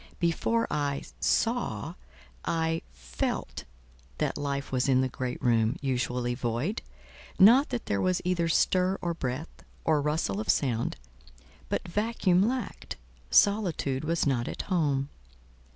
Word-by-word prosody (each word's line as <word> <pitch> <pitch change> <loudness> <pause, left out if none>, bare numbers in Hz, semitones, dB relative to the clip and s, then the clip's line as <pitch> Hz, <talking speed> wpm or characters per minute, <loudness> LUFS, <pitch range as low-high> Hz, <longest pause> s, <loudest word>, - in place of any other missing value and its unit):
Before 225 +7 +1
I 145 -2 -1 0.2
saw, 225 - 0 0.5
I 165 0 0
felt - - -4 0.5
that - - -1
life 140 -1 -3
was 130 +1 +1
in 130 -1 +4
the 130 - +1
great 130 0 -4
room, 115 0 +3
usually 125 -2 -1
void: 120 - -2 0.6
not 240 +9 +7
that 245 -2 -3
there 100 -1 0
was 185 -1 +2
either 180 -2 +1
stir 185 +3 +2
or 175 -2 -2
breath, 135 0 -5 0.2
or 155 -2 +3
rustle 150 -9 -1
of 110 - -4
sound, 120 -5 +1 0.7
but - - -2
Vacuum 200 -1 +2
lacked, 250 -3 -4 0.3
Solitude 175 - +3
was 165 +1 0
not 130 -4 +1
at - - -4
home. 145 -7 0
145 Hz, 130 wpm, -28 LUFS, 125-180 Hz, 0.7 s, not